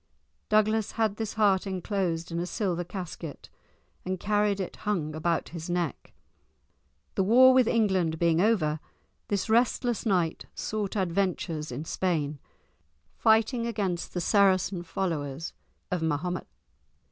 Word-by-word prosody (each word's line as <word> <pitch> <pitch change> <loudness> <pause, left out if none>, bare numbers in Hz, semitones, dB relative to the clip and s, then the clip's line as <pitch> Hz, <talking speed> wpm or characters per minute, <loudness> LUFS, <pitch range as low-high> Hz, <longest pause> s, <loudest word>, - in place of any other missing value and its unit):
Douglas 215 0 +2
had 220 -2 0
this 220 -2 -3
heart 200 -3 +3
enclosed 180 -3 -2
in 170 - -2
a 175 - -2
silver 175 -1 -1
casket 175 -4 -7 0.5
and 185 0 -3
carried 205 0 +1
it 190 - -4
hung 175 -8 -2
about 165 +2 -1
his 170 0 -7
neck. 175 -4 -2 1.0
The - - +1
war 255 +6 +7
with 255 -2 +5
England 190 -9 +2
being 170 0 +3
over, 170 -8 +2 0.5
this 200 -2 -1
restless 235 +1 +2
knight 180 -7 0
sought 210 -2 -3
adventures 175 -4 -1
in 140 +6 -5
Spain, 155 -6 -1 0.8
fighting 225 +2 +3
against 195 -7 -2
the 175 - 0
Saracen 190 -1 +3
followers 165 -4 -3 0.4
of 180 -2 0
Mahomet. 160 +3 -1
185 Hz, 125 wpm, -28 LUFS, 165-210 Hz, 1.0 s, war